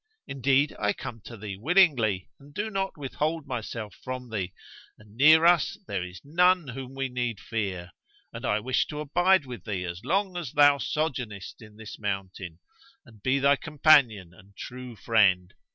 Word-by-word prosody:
Indeed, 140 +1 +1
I 105 0 +1
come 115 -2 -8
to 115 - -9
thee 100 -2 -7
willingly 125 - +2
and 145 +1 -17
do 220 +1 -3
not 195 -2 -2
withhold 150 +3 -3
myself 115 -4 -5
from 130 -2 -6
thee, 95 -4 -3 0.5
and 105 0 -19
near 155 +5 +6
us 170 -3 +4
there 100 -3 -3
is 90 0 -9
none 180 0 +3
whom 130 +1 -8
we 135 0 -2
need 125 -4 -3
fear; 95 -6 -4 0.4
and - - -8
I 105 +1 0
wish 130 +3 0
to 150 - -6
abide 175 +3 +2
with 125 -2 -8
thee 100 -5 -3
as 85 +2 -6
long 195 0 0
as 165 -8 -5
thou 145 -1 +5
sojournest 125 - -3
in 105 -2 -14
this 110 -1 -10
mountain, 95 -4 -5 0.5
and 110 -5 -18
be 130 +4 +1
thy 140 +1 +4
companion 135 - +3
and 90 +2 -18
thy - - -25
true 125 -1 -8
friend. 95 -6 +2
125 Hz, 175 wpm, -27 LUFS, 105-150 Hz, 0.5 s, near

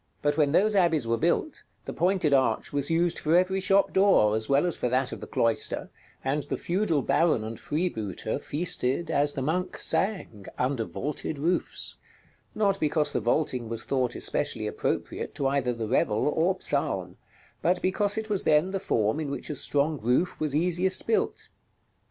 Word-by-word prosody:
But 145 0 +2
when 145 -2 +2
those 210 +7 +3
abbeys 165 -8 +3
were 115 0 +1
built, 170 - 0 0.2
the - - -5
pointed 180 -5 +1
arch 135 +1 +1
was 140 -1 -1
used 170 +1 +1
for 160 +3 +3
every 185 +1 +2
shop 195 +1 +3
door, 190 - +4
as 110 0 -3
well 140 +4 +3
as 175 - 0
for 125 - -1
that 130 +1 +1
of - - -7
the - - -7
cloister, 115 -1 -1 0.3
and 140 +3 0
the - - -4
feudal 170 -6 0
baron 160 -10 +2
and 110 +1 -6
freebooter 145 - -2
feasted, 155 -1 -1
as 145 +1 +2
the 135 - -3
monk 180 +6 -1
sang, 185 - -1
under 125 -2 0
vaulted 150 +4 -4
roofs; 170 +6 -2 0.6
not 200 -2 +1
because 150 0 +1
the - - +1
vaulting 120 0 0
was 115 -1 -3
thought 130 -3 -1
especially - - -1
appropriate - - -3
to 140 - -2
either 135 -2 +1
the 115 -2 -4
revel 110 -1 +1
or 170 +5 +1
psalm, 95 -11 -2 0.4
but 180 +2 +2
because 205 +3 0
it 220 0 -3
was 205 -3 0
then 155 +5 +3
the 195 - -2
form 110 - 0
in 150 -3 -3
which 140 - -4
a - - -4
strong 145 +2 +1
roof 125 +10 +1
was 150 -2 -1
easiest 180 +3 +1
built. 225 - -1
150 Hz, 180 wpm, -27 LUFS, 125-180 Hz, 0.6 s, door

